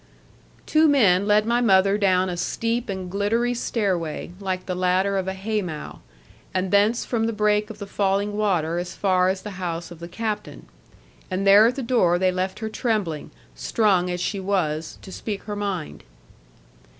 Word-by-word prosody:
Two 315 Hz, +1 st, +4 dB
men 205 Hz, -9 st, +4 dB
led 210 Hz, 0 st, +4 dB
my 235 Hz, +2 st, +1 dB
mother 195 Hz, -3 st, +4 dB
down 190 Hz, -2 st, +2 dB
a 180 Hz, -, -3 dB
steep 230 Hz, +6 st, -2 dB
and 190 Hz, -2 st, -4 dB
gliddery 225 Hz, +5 st, +1 dB
stair 210 Hz, -5 st, 0 dB
way, 165 Hz, 0 st, -5 dB
like 185 Hz, -2 st, -3 dB
the 185 Hz, -, -3 dB
ladder 185 Hz, +2 st, +1 dB
of 190 Hz, -1 st, -1 dB
a 190 Hz, -, -2 dB
hay 210 Hz, +2 st, -2 dB
mow; 160 Hz, -5 st, -7 dB, 0.6 s
and 185 Hz, 0 st, 0 dB
thence 205 Hz, +3 st, +3 dB
from 225 Hz, -2 st, 0 dB
the -, -, 0 dB
break 210 Hz, 0 st, +1 dB
of 220 Hz, -, -8 dB
the 205 Hz, -, -6 dB
falling 200 Hz, +1 st, 0 dB
water 175 Hz, -6 st, 0 dB
as 175 Hz, 0 st, -5 dB
far 185 Hz, -2 st, +2 dB
as 190 Hz, 0 st, -2 dB
the 195 Hz, -3 st, -7 dB
house 170 Hz, -1 st, -4 dB
of 170 Hz, -, -10 dB
the 170 Hz, -, -7 dB
captain. 210 Hz, +3 st, -5 dB, 0.6 s
And 190 Hz, +1 st, -2 dB
there 200 Hz, +3 st, +7 dB
at 245 Hz, -, -1 dB
the 270 Hz, -, -4 dB
door 210 Hz, -8 st, +3 dB
they 185 Hz, 0 st, +2 dB
left 185 Hz, +1 st, -2 dB
her 220 Hz, -, -2 dB
trembling, 210 Hz, -, -2 dB, 0.2 s
strung 190 Hz, -5 st, +1 dB
as 180 Hz, 0 st, -2 dB
she 195 Hz, +3 st, -2 dB
was, 165 Hz, -5 st, -1 dB
to 190 Hz, -, -10 dB
speak 205 Hz, +1 st, -5 dB
her 210 Hz, -, -5 dB
mind. 200 Hz, -6 st, -4 dB
195 Hz, 185 wpm, -23 LUFS, 185-215 Hz, 0.6 s, there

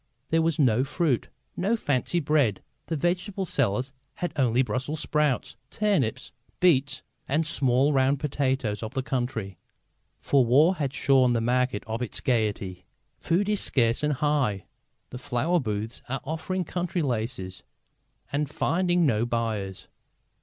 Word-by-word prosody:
There 165 Hz, 0 st, +4 dB
was 160 Hz, -1 st, +1 dB
no 125 Hz, -4 st, +3 dB
fruit, 145 Hz, -2 st, 0 dB, 0.3 s
no 200 Hz, +6 st, +1 dB
fancy 145 Hz, -, 0 dB
bread. 140 Hz, -, +1 dB, 0.2 s
The 165 Hz, -, -1 dB
vegetable 185 Hz, +5 st, -1 dB
sellers 130 Hz, -, 0 dB, 0.2 s
had 175 Hz, -, -3 dB
only 130 Hz, -3 st, +3 dB
Brussels 130 Hz, +5 st, -3 dB
sprouts, 150 Hz, -4 st, 0 dB
turnips, 200 Hz, -, 0 dB, 0.3 s
beets 145 Hz, -6 st, +2 dB, 0.2 s
and 155 Hz, +4 st, +1 dB
the -, -, -6 dB
small 135 Hz, -1 st, +2 dB
round 135 Hz, +1 st, +2 dB
potatoes 130 Hz, -7 st, -1 dB
of 110 Hz, +3 st, -6 dB
the 130 Hz, -, -1 dB
country. 115 Hz, -9 st, -3 dB, 0.6 s
For 140 Hz, -2 st, +3 dB
war 145 Hz, +9 st, +5 dB
has 140 Hz, -4 st, -1 dB
shorn 130 Hz, -3 st, +4 dB
the 115 Hz, -, +1 dB
market 125 Hz, -1 st, 0 dB
of 115 Hz, +1 st, -4 dB
its 125 Hz, -, -2 dB
gaiety. 100 Hz, -7 st, -1 dB, 0.3 s
Food 180 Hz, +5 st, +1 dB
is 210 Hz, -1 st, +1 dB
scarce 115 Hz, -3 st, +2 dB
and 150 Hz, 0 st, +1 dB
high. 140 Hz, -9 st, 0 dB, 0.5 s
The 125 Hz, -, -6 dB
flower 145 Hz, +7 st, 0 dB
booths 110 Hz, -2 st, -4 dB
are 135 Hz, +1 st, -2 dB
offering 165 Hz, +5 st, -3 dB
country 175 Hz, +1 st, -2 dB
laces 110 Hz, -7 st, -3 dB, 0.7 s
and 145 Hz, 0 st, -1 dB
finding 175 Hz, +2 st, +1 dB
no 115 Hz, -4 st, +1 dB
buyers. 110 Hz, -5 st, -3 dB
135 Hz, 145 wpm, -26 LUFS, 115-155 Hz, 0.7 s, war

